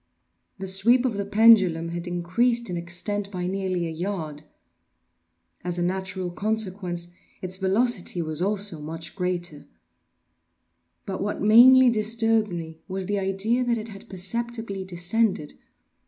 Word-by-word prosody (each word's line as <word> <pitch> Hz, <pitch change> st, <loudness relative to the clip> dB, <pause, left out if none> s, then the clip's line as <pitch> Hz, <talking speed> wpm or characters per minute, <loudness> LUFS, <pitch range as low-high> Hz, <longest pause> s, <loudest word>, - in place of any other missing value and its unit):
The 190 Hz, -, -6 dB
sweep 230 Hz, +7 st, +3 dB
of 250 Hz, -, +1 dB
the 200 Hz, 0 st, -3 dB
pendulum 195 Hz, -7 st, +5 dB
had 170 Hz, +1 st, -5 dB
increased 205 Hz, +6 st, 0 dB
in -, -, -2 dB
extent 175 Hz, +4 st, -2 dB
by 180 Hz, -3 st, -4 dB
nearly 185 Hz, -2 st, -2 dB
a 165 Hz, -, -4 dB
yard. 160 Hz, -3 st, -4 dB, 1.2 s
As 175 Hz, 0 st, -3 dB
a 175 Hz, -, 0 dB
natural 190 Hz, 0 st, -2 dB
consequence, 185 Hz, -4 st, -2 dB, 0.3 s
its 185 Hz, 0 st, -1 dB
velocity 195 Hz, 0 st, +1 dB
was 155 Hz, -1 st, -3 dB
also 200 Hz, -3 st, -1 dB
much 160 Hz, +2 st, -6 dB
greater. 175 Hz, -5 st, -3 dB, 1.4 s
But 190 Hz, -1 st, -4 dB
what 205 Hz, +1 st, -2 dB
mainly 245 Hz, +4 st, +8 dB
disturbed 225 Hz, 0 st, +1 dB
me 165 Hz, -2 st, -7 dB
was 190 Hz, -1 st, -4 dB
the 205 Hz, +1 st, -1 dB
idea 195 Hz, +6 st, 0 dB
that 230 Hz, -2 st, -2 dB
had 195 Hz, -2 st, -12 dB
perceptibly 225 Hz, +1 st, -2 dB
descended. 185 Hz, -1 st, 0 dB
190 Hz, 130 wpm, -25 LUFS, 175-220 Hz, 1.4 s, mainly